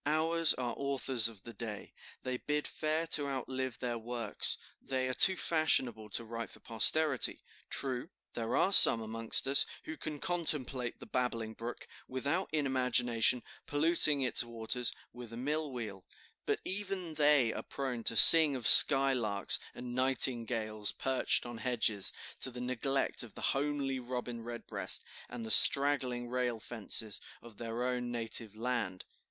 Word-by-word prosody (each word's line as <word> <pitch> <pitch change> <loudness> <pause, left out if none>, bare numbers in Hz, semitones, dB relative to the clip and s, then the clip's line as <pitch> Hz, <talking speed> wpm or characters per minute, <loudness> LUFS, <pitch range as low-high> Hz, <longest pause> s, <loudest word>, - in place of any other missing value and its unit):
Ours 160 +2 0
are 120 -2 -5
authors 135 -4 0
of 110 -5 -12
the 115 - -12
day, 110 -3 -9 0.3
they 130 0 -5
bid 150 +3 -4
fair 155 +1 -4
to 150 -3 0
outlive 130 -2 -6
their 120 -2 -5
works; 115 -1 -1 0.2
they 130 -1 -4
are 130 - -4
too 190 +8 +5
fashionable 125 -11 -1
to 115 - -5
write 115 +1 -8
for - - -14
posterity. 130 +5 +1 0.3
True, 130 +2 -3 0.2
there 115 -1 -5
are 195 - 0
some 115 - +9
amongst 115 +2 +1
us, 140 +1 +5 0.2
who 160 - -9
can 155 -1 -7
contemplate 140 -7 -2
the - - -12
babbling 115 -3 -4
brook, 115 +2 -10 0.2
without, 140 +8 -4
in 150 -2 -2
imagination, 125 -2 0 0.2
polluting 150 -1 +3
its 125 - +2
waters 115 +1 -4 0.2
with 120 -1 -12
a - - -9
mill 150 +3 -4
wheel; 105 -7 -9 0.4
but - - -2
even 190 -3 -4
they 145 -6 +2
are - - -7
prone 125 -4 -7
to 115 - 0
sing 155 +4 +9
of 125 -4 -3
skylarks 130 -8 +6 0.2
and 125 0 -9
nightingales 115 -5 -1
perched 130 -1 -2
on 120 -1 -10
hedges, 110 -5 -2 0.3
to - - -3
the 125 -1 -11
neglect 130 +2 -3
of 120 -4 -8
the - - -11
homely 140 -1 -4
robin 125 -1 -8
redbreast 120 0 -4 0.2
and 120 -2 -8
the 110 - -3
straggling 130 -4 +6
rail 125 -2 -4
fences 110 -2 -3 0.2
of 115 -3 -16
their 115 +1 -6
own 125 -1 -4
native 115 -2 -4
land." 115 -5 -5
125 Hz, 155 wpm, -30 LUFS, 115-140 Hz, 0.4 s, some